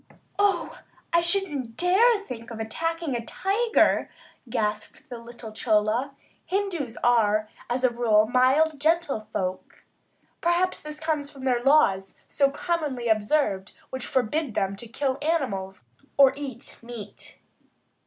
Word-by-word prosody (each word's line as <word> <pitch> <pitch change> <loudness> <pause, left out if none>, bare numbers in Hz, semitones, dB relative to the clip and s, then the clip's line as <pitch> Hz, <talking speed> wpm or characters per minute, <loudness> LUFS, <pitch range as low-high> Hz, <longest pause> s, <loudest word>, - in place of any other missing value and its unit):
"Oh, 400 -4 +1 0.3
I 340 - +5
shouldn't 320 -10 -2
dare 360 +2 +2
to 475 0 +6
even 405 -1 -6
think 230 - -8
of 230 -2 -7
attacking 330 +6 -2
a 235 - -3
tiger," 425 - +2 0.4
gasped 210 -2 -2 0.2
the 245 - -6
gentle 230 - -12
little 235 -1 -9
Chola. 220 +4 +1 0.3
Hindus 360 - -2
are 215 -3 +3 0.2
as 250 +2 -1
a 255 - +4
rule 220 -3 +3
mild, 270 +5 +3
gentle 305 -8 +1
folk. 185 -2 -4 0.6
Perhaps 345 +2 +1
this 300 0 -8
comes 310 -3 -1
from 275 -2 -12
their 250 -2 +2
laws, 220 -9 +3
so 275 -1 +2
commonly 285 -6 -2
observed, 210 -3 +1 0.2
which 260 -2 -5
forbid 260 0 0
them 195 0 0
to 235 - -8
kill 260 +3 -2
animals 200 - -2 0.3
or 275 -1 +7
eat 275 -4 -7
meat. 230 -3 -9
260 Hz, 140 wpm, -26 LUFS, 225-320 Hz, 0.6 s, or